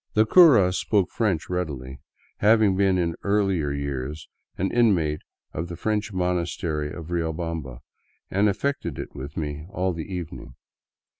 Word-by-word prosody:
The 110 +1 +5
cura 115 - +7
spoke 100 0 +1
French 95 -8 0
readily, 70 -7 -4 0.4
having 105 -2 +4
been 95 -1 +3
in 85 -2 0
earlier 95 -7 +1
years 70 +1 -4 0.3
an 95 +2 -1
inmate 90 -11 +2 0.3
of 80 +3 -3
the 85 - -6
French 105 +3 -1
monastery 85 -4 -1
of 85 0 -8
Riobamba, 80 -6 -3 0.5
and 100 +2 +3
affected 100 - -2
it - - -6
with 70 +3 -8
me 75 0 -4
all 95 -2 -1
the 80 +3 -6
evening. 85 -7 -6
90 Hz, 140 wpm, -25 LUFS, 75-100 Hz, 0.5 s, cura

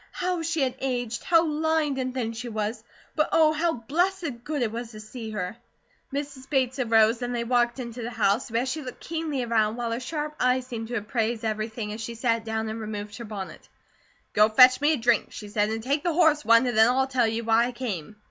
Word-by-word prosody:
How 360 -1 -1
she 325 -1 -1
had 260 -2 +1
aged! 245 -3 -2
How 335 -1 +4
lined 310 -2 0
and 255 0 -1
thin 240 -3 -3
she 235 +2 -6
was! 220 +1 -3 0.3
But 305 +1 +2
Oh, 310 -1 +5
how 325 +2 +1
blessed 305 - -1
good 295 -2 -2
it 220 - -1
was 235 +1 -5
to 215 - -9
see 220 +1 -8
her! 205 -2 -4 0.6
Mrs. 275 -1 -5
Bates 265 -2 +1
arose 225 -1 +3
and 245 0 -2
they 235 - -1
walked 240 0 +1
into 240 -1 -6
the 235 - -3
house, 225 0 +1
where 230 +2 0
she 290 +4 -3
looked 255 -3 -8
keenly 320 -5 -3
around, 220 -2 +1
while 235 -1 -3
her 230 - -1
sharp 300 +3 -4
eyes 250 0 +2
seemed 230 -3 -5
to 245 - -4
appraise 225 +1 -1
everything 215 0 -3
as 220 - -6
she 230 +1 -5
sat 230 -1 0
down 220 0 -2
and 220 +1 -5
removed 210 -1 -6
her 235 - -7
bonnet. 205 -3 -8 0.6
"Go 210 +1 +5
fetch 255 +4 +7
me 300 +2 +4
a - - 0
drink," 235 -2 +1
she 210 - -8
said, 210 0 +1
"and 220 0 -3
take 280 +4 0
the 345 - +1
horse 315 -3 +4
one 230 +2 +5
and 245 -2 -1
then 220 +2 +6
I'll 265 +2 +2
tell 255 -3 +1
you 225 +1 -2
why 225 +1 +4
I - - -4
came." 215 -8 -5
240 Hz, 230 wpm, -26 LUFS, 225-275 Hz, 0.6 s, fetch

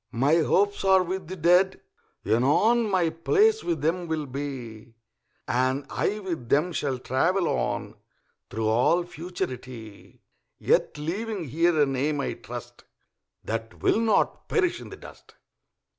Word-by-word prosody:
My 135 +7 +3
hopes 200 +5 +2
are 190 -1 +5
with 185 0 -4
the 185 - -6
Dead, 180 +3 +3 0.5
anon 210 - +3
My 180 -4 +2
place 425 - +2
with 165 -4 -2
them 170 +3 0
will 160 -2 -2
be, 125 -5 -7 0.5
And 130 +3 0
I 210 - -1
with 170 - -5
them 165 +5 +2
shall 140 -4 -1
travel 165 +9 +1
on - - -2 0.6
Through 110 +1 -2
all 125 +11 +3
Futurity; 130 - -7 0.3
Yet - - +1
leaving 195 +6 -3
here 165 +3 +2
a 145 - +5
name, 140 +2 -1
I - - -2
trust, - - -9 0.6
That 115 0 -5
will - - +3
not 225 -1 +1
perish 360 -4 +1
in - - -10
the - - -10
dust. - - -15
160 Hz, 140 wpm, -26 LUFS, 130-185 Hz, 0.6 s, are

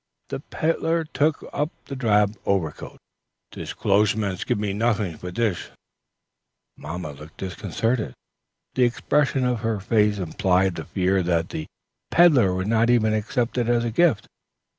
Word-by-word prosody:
The - - -4
peddler 165 +1 -1
took 155 -1 0
up 150 +1 0 0.2
the 140 - -6
drab 105 -5 +2
overcoat. 90 -7 -2 0.5
"Te - - -8
closhesman's 100 -1 +1
give - - 0
noting 105 -2 0
for 90 - -6
dish." 105 -1 -1 1.1
Mamma 85 -3 -6
looked 75 +3 -13
disconcerted. 95 - -2 0.6
The 130 - +2
expression 135 +2 +1
of 125 -2 0
her 110 -2 -1
face 105 0 +2
implied 95 +1 +1
the - - -6
fear 95 0 +1
that 85 -1 0
the 80 - -5 0.4
peddler 135 - +5
would 95 0 -2
not 115 +2 +2
even 110 -3 +3
accept 120 +3 -1
it 120 -1 0
as 120 -1 +2
a 115 - -1
gift. 150 -2 +3
105 Hz, 140 wpm, -24 LUFS, 95-120 Hz, 1.1 s, peddler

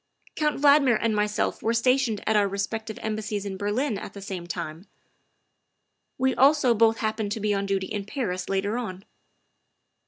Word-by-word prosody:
" - - -29
Count 300 -2 0
Valdmir 280 -4 +5
and 225 -2 0
myself 210 +1 0
were 230 +1 0
stationed 250 -2 +2
at 220 - +2
our 205 -1 +4
respective 215 +3 -4
Embassies 215 -2 -3
in 195 -1 -4
Berlin 205 +4 -1
at - - -8
the 200 - -9
same 185 -3 -6
time; 170 +1 -6 1.3
we 260 0 +2
also 275 -2 +4
both 225 0 +3
happened 215 -2 -2
to 225 - -4
be 210 0 0
on 200 0 -1
duty 195 -1 0
in 205 +1 -4
Paris 185 -7 -3
later 200 +4 0
on. 195 -5 -6
215 Hz, 175 wpm, -26 LUFS, 200-235 Hz, 1.3 s, Valdmir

